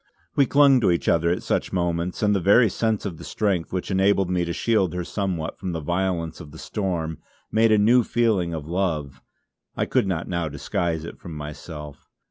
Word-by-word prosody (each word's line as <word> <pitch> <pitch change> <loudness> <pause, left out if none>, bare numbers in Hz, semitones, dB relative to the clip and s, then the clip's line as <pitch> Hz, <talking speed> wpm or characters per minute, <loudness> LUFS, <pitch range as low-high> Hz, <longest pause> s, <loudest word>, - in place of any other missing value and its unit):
We 140 -2 +4
clung 140 -2 +5
to 105 - +3
each 85 -1 0
other 85 0 +3
at 90 - -1
such - - -1
moments, 85 +1 -1
and 105 0 +4
the - - +2
very 105 +6 +5
sense 110 0 -1
of 90 -5 -4
the - - -9
strength 95 -6 -1
which 95 +1 -3
enabled 95 -1 +2
me 90 -1 +1
to 85 - -3
shield 95 -3 +1
her 90 - -2
somewhat 90 -4 -3
from 95 -3 -4
the 80 - -2
violence 85 0 -2
of 80 -4 -10
the 80 - -12
storm, 85 -5 -3 0.3
made 115 0 +4
a 110 - +5
new 115 +4 +5
feeling 110 -7 +1
of 80 -3 -5
love 80 -6 -2 0.6
I - - +1
could - - +1
not 85 -3 -2
now 85 -3 -2
disguise 80 +3 -2
it - - -9
from 85 -3 -9
myself. 75 0 -8
90 Hz, 205 wpm, -24 LUFS, 80-100 Hz, 0.6 s, clung